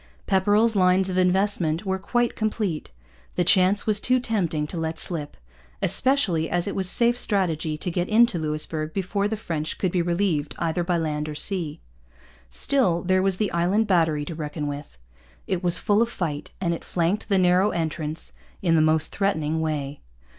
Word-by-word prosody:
Pepperrell's 205 +4 +2
lines 185 0 +3
of 185 - -2
investment 180 -2 +1
were 190 0 -1
quite 240 +5 0
complete. 215 -7 -2 0.5
The 180 - +2
chance 185 +3 +3
was 215 -2 +1
too 255 +3 +2
tempting 185 -11 -1
to 170 - -7
let 160 0 -3
slip, 155 -5 -4 0.4
especially 200 - +2
as 175 -1 0
it 200 - -3
was 190 -2 0
safe 240 +3 +3
strategy 165 -6 0
to 180 - -3
get 175 +1 -2
into 225 -4 +4
Louisbourg 155 0 -3
before 200 +1 -1
the 220 +1 -3
French 155 -7 -4
could 185 - -1
be 180 - +1
relieved 170 -4 -1
either 170 +1 -1
by 175 0 0
land 155 -2 -2
or 150 - -6
sea. 165 -2 -1 0.7
Still, 175 - +1
there 185 +1 +2
was 190 -1 +1
the 210 -1 -1
Island 180 +6 +1
Battery 160 -6 +1
to 165 - -6
reckon 150 -1 -5
with. 145 - -6 0.5
It 185 -1 -2
was 175 0 +4
full 210 0 +2
of 235 - +1
fight, 155 -9 -4
and 175 -3 0
it 165 - -6
flanked 175 +4 -1
the 195 - +3
narrow 185 +2 +3
entrance 160 -2 -3 0.3
in 165 -3 +3
the 160 - +4
most 155 0 +2
threatening 160 -6 0
way. 150 -3 -3
175 Hz, 180 wpm, -24 LUFS, 160-200 Hz, 0.7 s, into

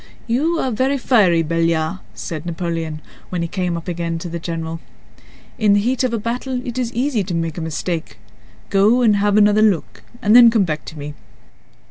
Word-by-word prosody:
"You 305 +9 0
are 260 - -1
very 260 +5 +1
fiery, 200 -10 +3
Belliard," 165 +1 0 0.2
said 155 -3 -5
Napoleon, 165 -2 -3 0.3
when 175 -2 -2
he - - -1
again 165 - -8
came 180 -3 -1
up 165 - -8 0.4
to 175 - -5
the 170 +1 -5
general. 165 -1 -4 0.8
"In 210 -2 +4
the 205 - +4
heat 245 +5 0
of 255 - +1
a 230 - 0
battle 245 +3 -3
it 245 +1 -4
is 240 -2 -2
easy 245 -3 0
to 180 -2 -4
make 165 -1 -2
a - - -4
mistake. 160 -2 -4 0.5
Go 215 +6 +4
and 210 -3 +4
have 205 0 +2
another 210 0 +5
look 205 -7 +1 0.2
and 210 +2 +3
then 240 -1 +9
come 225 -3 +3
back 155 -4 -3
to 155 - -9
me." 145 0 -6
195 Hz, 195 wpm, -19 LUFS, 165-235 Hz, 0.8 s, then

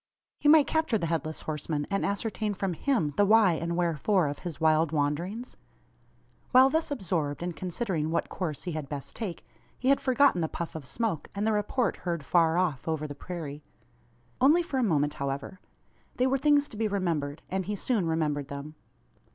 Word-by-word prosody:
He 295 - +3
might 305 -2 +7
capture 315 -7 +1
the 170 - -2
Headless 160 -1 -2
Horseman, 150 -1 -2
and 195 - 0
ascertain 210 +1 -2
from 190 -1 -1
him 170 - 0
the 205 - +5
why 210 -3 +5
and 170 +1 -2
wherefore 175 0 +2
of 145 - -5
his 170 -4 -6
wild 160 -1 +3
wanderings? 170 - -2 0.9
While 260 +1 +7
thus 320 +2 0
absorbed, 170 - -2
in 175 0 -3
considering 180 -3 -2
what 165 - 0
course 160 -6 -4
he 180 - -3
had 155 -4 -5
best 140 -2 -6
take, 200 -8 -5 0.3
he 260 - 0
had 275 - +4
forgotten 260 -7 +3
the 160 - +1
puff 170 +1 -5
of 155 -5 -7
smoke, 220 - -2
and 205 +1 -1
the 220 - +2
report 210 +4 0
heard 170 -5 -3
far 165 0 +3
off 170 -7 0
over 160 -1 -1
the 145 - -5
prairie. 150 -1 -7 0.8
Only 310 +7 +5
for 285 -6 -2
a - - +2
moment, 150 -7 +2
however. 140 +7 -4 0.6
They 250 - +2
were 265 +1 +2
things 290 0 +4
to 215 - -9
be 220 0 +1
remembered; 165 -8 -2
and 190 -1 -2
he 210 - -1
soon 205 -3 0
remembered 150 -3 0
them. 140 +2 -7
175 Hz, 190 wpm, -28 LUFS, 155-220 Hz, 0.9 s, might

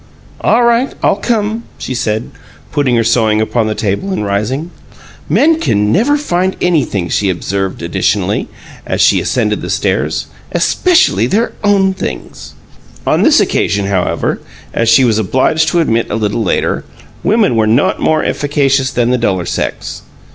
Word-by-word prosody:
"All 240 +2 +3
right; 235 +3 +2
I'll - - +3
come," 220 +1 -1 0.2
she - - -5
said, 110 -2 -2 0.4
putting 135 -4 +1
her 115 - +2
sewing 110 -2 +2
upon 110 +1 0
the 110 - -2
table 105 - -2
and 105 - -2
rising. 120 - -2 0.6
"Men 320 +2 +3 0.3
never 260 - +3
can 295 - -3
find 185 -5 0
anything," 140 - 0
she 100 +2 0
observed, 95 +1 -3
additionally, 100 - 0 0.4
as - - -3
she - - +4
ascended - - -1
the - - -6
stairs. - - -1 0.3
"Especially 120 - +2
their 220 - 0
own 195 -2 +3
things!" 60 - -7 0.5
On - - +2
this - - +5
occasion, 100 -1 0
however, 95 -2 -1 0.3
as 115 -1 +1
she 115 +3 +5
was 110 -3 +2
obliged 130 - +1
to 170 +2 +2
admit 115 -7 0
a - - -2
little 110 +1 -1
later, 105 - 0 0.4
women 210 - +2
were 110 -1 +2
not 115 +6 +2
more 155 -1 +1
efficacious 140 -2 +1
than 120 -1 0
the 125 - +1
duller 95 -6 0
sex. - - -4
125 Hz, 155 wpm, -14 LUFS, -, 0.6 s, this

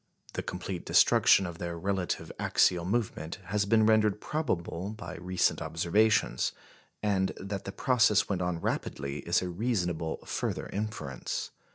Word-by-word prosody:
The - - -2
complete 90 0 -5
destruction 95 - +5
of 85 -1 -6
their 85 -1 -4
relative 95 +1 -2
axial 90 -2 +3
movement 100 -5 -2
has 100 +3 0
been 110 +1 +4
rendered 110 -1 +3
probable 95 - -2
by 90 -4 -7
recent 90 0 0
observations; 85 +7 +2 0.5
and 95 -2 +1
that 100 0 -5
the 100 - -4
process 110 -3 +3
went 95 -3 -1
on 90 -2 -1
rapidly 70 -3 -3
is - - +1
a 90 - -3
reasonable 90 -5 -1
further - - -2
inference. 100 -11 -4
95 Hz, 140 wpm, -29 LUFS, 85-105 Hz, 0.5 s, destruction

